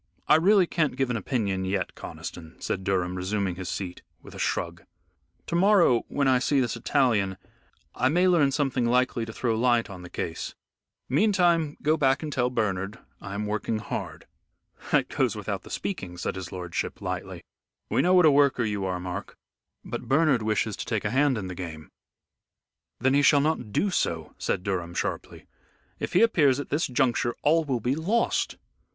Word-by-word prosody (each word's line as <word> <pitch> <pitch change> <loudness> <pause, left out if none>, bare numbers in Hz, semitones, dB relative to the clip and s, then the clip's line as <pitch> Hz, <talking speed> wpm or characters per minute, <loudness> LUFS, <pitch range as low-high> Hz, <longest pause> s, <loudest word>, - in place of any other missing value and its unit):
I - - +6
really 185 +4 +5
can't 160 -5 0
give 135 -1 0
an - - -1
opinion 100 -4 -1
yet, 95 -1 -2
Conniston," 80 0 -9
said 95 - -3
Durham 90 -2 0
resuming 95 +1 -1
his 90 +1 -6
seat, 90 -3 -5 0.2
with - - -12
a - - -9
shrug; - - -2 0.6
"to - - -6
morrow, 175 - +4
when 140 -1 0
I 130 -1 +4
see 140 +2 +2
this 120 -2 0
Italian, 115 -6 +1 0.6
I 130 - +1
may 180 +5 +3
learn 160 -6 +4
something 135 -4 0
likely 125 -1 +1
to - - -6
throw 115 0 -1
light 120 -1 +2
on 95 -2 -9
the 90 - -10
case. 80 -1 -5 0.5
Meantime 170 - +2
go 155 +2 +3
back 135 0 +2
and 150 -2 -4
tell 125 -1 +1
Bernard 105 -3 -2 0.2
I 100 0 -6
am 105 +1 -2
working 105 +1 -2
hard." 110 - -6 0.7
"That - - +3
goes - - 0
without - - -4
the - - -14
speaking," 95 -3 -4
said 90 - -3
his 95 -3 -6
lordship, 90 -2 -4
lightly; - - -5 0.4
"we - - +1
know 180 +1 +4
what 180 -2 +6
a 155 - +7
worker 140 -3 +3
you 105 -3 -2
are, 90 -1 -2
Mark. 90 +2 -6 0.5
But - - -5
Bernard 140 -3 +3
wishes 110 -1 0
to - - -5
take 110 -4 -1
a 105 - 0
hand 135 0 +3
in 100 - -4
the 95 - -5
game." 80 -4 -7 1.1
"Then 130 +1 +2
he 140 - +4
shall 145 0 +5
not 140 -7 -1
do 195 - +1
so," 80 - -1
said 90 - -1
Durham, 90 -3 -3
sharply. - - -4 0.5
"If - - -4
he 180 - +5
appears 145 - +4
at 145 - -5
this 150 +3 0
juncture 125 -2 +1
all 160 +2 +3
will 130 -4 -1
be 125 +4 0
lost. 190 +10 0
120 Hz, 185 wpm, -26 LUFS, 95-145 Hz, 1.1 s, a